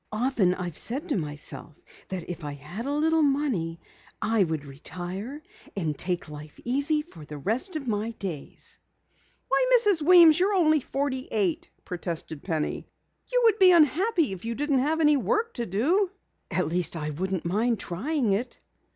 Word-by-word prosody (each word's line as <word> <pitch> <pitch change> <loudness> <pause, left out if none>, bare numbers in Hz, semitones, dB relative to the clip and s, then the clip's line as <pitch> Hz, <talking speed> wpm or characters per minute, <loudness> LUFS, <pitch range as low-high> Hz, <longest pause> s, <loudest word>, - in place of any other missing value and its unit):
Often 215 -5 +1
I've 175 -4 -5
said 280 +9 -4
to - - +1
myself 150 -2 -5 0.3
that 185 -3 -5
if 175 -2 -6
I 145 -1 -4
had 175 - -7
a - - -1
little 320 +2 +2
money 270 - 0 0.4
I 220 -2 +2
would 160 -4 -3
retire 185 - -7 0.3
and 160 -6 -1
take 175 +3 -2
life 150 0 -11
easy 285 +5 +1
for 230 - -14
the 150 0 -8
rest 235 - 0
of 285 -4 -4
my 215 0 -1
days." 190 -10 -7 0.7
"Why, - - +2
Mrs. 410 -8 +3
Weems, 335 -1 +7
you're 395 +3 +2
only 310 -4 +4
forty 270 -1 -2
eight!" 195 -6 0 0.2
protested 170 -4 -5
Penny. 160 -5 -3 0.4
"You - - +3
would 445 -2 +4
be 375 -1 +8
unhappy 340 - +3
if 190 -1 -7
you 230 +1 -3
didn't 285 0 +1
have 310 +5 +1
any 300 -2 +5
work 430 - 0
to 235 -2 -3
do." 325 - +1 0.4
"At 180 - 0
least, 170 +1 +3
I 150 -1 -3
wouldn't 185 +3 -3
mind 220 +5 +1
trying 230 - -1
it." 235 +5 -2
225 Hz, 170 wpm, -26 LUFS, -, 0.7 s, be